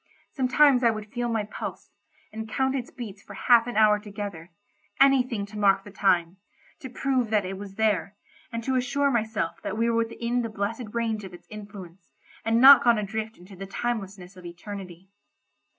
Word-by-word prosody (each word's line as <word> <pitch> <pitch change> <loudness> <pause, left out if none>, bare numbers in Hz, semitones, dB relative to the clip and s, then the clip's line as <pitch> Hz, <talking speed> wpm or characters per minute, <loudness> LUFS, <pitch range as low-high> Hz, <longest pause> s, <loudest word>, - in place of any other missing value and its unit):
Sometimes 265 0 +3
I 235 - +5
would 215 -2 -5
feel 240 -1 -2
my 225 -2 0
pulse, 205 - -7 0.4
and 220 0 -6
count 265 +3 0
its 250 -3 -4
beats 215 -6 -9
for 200 - -12
half 235 +2 +4
an 240 - -4
hour 210 -1 +5
together; 200 -5 -7 0.5
anything 255 -6 +3
to 210 +1 -9
mark 195 -1 +3
the 205 - -12
time—to 190 +6 -2
prove 255 -2 -1
that 210 -3 +1
it 190 +1 -4
was 195 0 -9
there, 205 -3 0 0.4
and 230 -1 -4
to 265 - -1
assure 270 +3 +1
myself 220 -7 -2
that 215 - -4
we 230 +1 +1
were 230 - 0
within 235 +1 -1
the 230 - -3
blessed 215 +3 -4
range 225 -2 -1
of 185 -2 -9
its - - -17
influence, 200 -4 -11 0.3
and 225 +1 +2
not 275 +2 +9
gone 235 -2 +4
adrift 220 +1 -4
into 185 +3 -14
the 195 +1 -8
timelessness 195 -4 -4
of 180 - -13
eternity. 180 +1 -9
215 Hz, 180 wpm, -26 LUFS, 195-240 Hz, 0.5 s, not